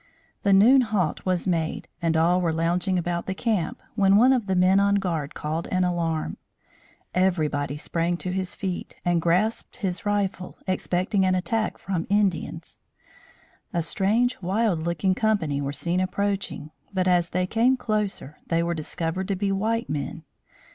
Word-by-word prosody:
The 200 Hz, -, +2 dB
noon 230 Hz, +8 st, +7 dB
halt 205 Hz, -8 st, -1 dB
was 180 Hz, -2 st, +1 dB
made 165 Hz, -4 st, -1 dB
and 165 Hz, -1 st, +1 dB
all 175 Hz, +3 st, +3 dB
were 170 Hz, -2 st, +1 dB
lounging 175 Hz, +3 st, 0 dB
about 175 Hz, 0 st, -2 dB
the 190 Hz, -, -2 dB
camp, 225 Hz, +1 st, -1 dB
when 200 Hz, -3 st, +4 dB
one 250 Hz, +5 st, +6 dB
of 240 Hz, -6 st, 0 dB
the 190 Hz, -, +1 dB
men 185 Hz, +2 st, +4 dB
on 200 Hz, 0 st, +3 dB
guard 165 Hz, -7 st, -2 dB
called 155 Hz, +2 st, -3 dB
an 185 Hz, 0 st, +1 dB
alarm. 165 Hz, -3 st, -1 dB, 0.8 s
Everybody 150 Hz, -6 st, 0 dB
sprang 170 Hz, +3 st, -1 dB
to 185 Hz, -, -4 dB
his 185 Hz, -1 st, -2 dB
feet 185 Hz, -3 st, -4 dB
and 175 Hz, -1 st, +2 dB
grasped 180 Hz, +7 st, 0 dB
his 185 Hz, 0 st, -3 dB
rifle, 200 Hz, -3 st, -2 dB
expecting 185 Hz, +1 st, 0 dB
an 185 Hz, 0 st, +3 dB
attack 215 Hz, +4 st, -1 dB
from 180 Hz, -4 st, -3 dB
Indians. 190 Hz, -5 st, -1 dB, 0.9 s
A 170 Hz, -, 0 dB
strange 215 Hz, +9 st, +1 dB
wild 195 Hz, 0 st, +1 dB
looking 170 Hz, +3 st, 0 dB
company 185 Hz, -, 0 dB
were 140 Hz, 0 st, -2 dB
seen 170 Hz, +6 st, -1 dB
approaching, 190 Hz, -4 st, -2 dB, 0.2 s
but, 185 Hz, -2 st, 0 dB
as 175 Hz, -2 st, +3 dB
they 180 Hz, +1 st, 0 dB
came 235 Hz, +7 st, +2 dB
closer, 210 Hz, -, -2 dB
they 165 Hz, 0 st, +1 dB
were 170 Hz, 0 st, 0 dB
discovered 165 Hz, +3 st, -3 dB
to 195 Hz, -, 0 dB
be 195 Hz, +1 st, -1 dB
white 225 Hz, +4 st, 0 dB
men. 150 Hz, +2 st, -4 dB
185 Hz, 160 wpm, -25 LUFS, 170-200 Hz, 0.9 s, noon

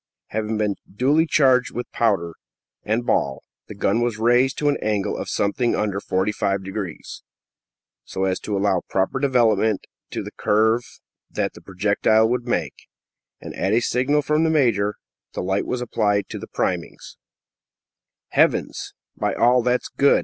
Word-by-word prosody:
Having 110 Hz, 0 st, -2 dB
been 105 Hz, -2 st, 0 dB, 0.2 s
duly 145 Hz, +10 st, +2 dB
charged 130 Hz, -5 st, +4 dB
with 120 Hz, -, -5 dB
powder 95 Hz, -8 st, +1 dB, 0.5 s
and 115 Hz, +3 st, -1 dB
ball, 65 Hz, -, 0 dB, 0.2 s
the 105 Hz, -, -9 dB
gun 100 Hz, +3 st, +1 dB
was 120 Hz, -2 st, 0 dB
raised 120 Hz, +4 st, +3 dB
to 150 Hz, -, 0 dB
an 145 Hz, -, +2 dB
angle 105 Hz, -2 st, -1 dB
of -, -, -5 dB
something 115 Hz, +4 st, 0 dB
under 100 Hz, -2 st, -1 dB
45 100 Hz, 0 st, -1 dB
degrees, 95 Hz, -3 st, -6 dB, 0.8 s
so 95 Hz, -, -4 dB
as 95 Hz, -1 st, 0 dB
to 105 Hz, -2 st, -3 dB
allow 95 Hz, -2 st, +1 dB
proper 95 Hz, +7 st, 0 dB
development 110 Hz, -6 st, +2 dB, 0.2 s
to -, -, -4 dB
the -, -, -8 dB
curve 110 Hz, +3 st, +2 dB, 0.5 s
that -, -, -2 dB
the -, -, -13 dB
projectile 105 Hz, +3 st, +2 dB
would 125 Hz, +1 st, -2 dB
make, -, -, -3 dB, 0.5 s
and, -, -, -8 dB
at 95 Hz, -, -1 dB
a 115 Hz, -, +5 dB
signal 130 Hz, +5 st, +1 dB
from 150 Hz, +2 st, +2 dB
the 165 Hz, -, +2 dB
major, 115 Hz, -9 st, +2 dB, 0.4 s
the -, -, -3 dB
light 95 Hz, +2 st, -1 dB
was 125 Hz, -, -2 dB
applied 105 Hz, -4 st, 0 dB
to -, -, -6 dB
the -, -, -8 dB
priming. -, -, -2 dB, 1.3 s
"Heavens!" -, -, +1 dB, 0.2 s
"By -, -, -1 dB
all 125 Hz, +1 st, +4 dB
that's 125 Hz, +1 st, 0 dB
good!" 140 Hz, -, +3 dB
110 Hz, 155 wpm, -22 LUFS, 100-125 Hz, 1.3 s, a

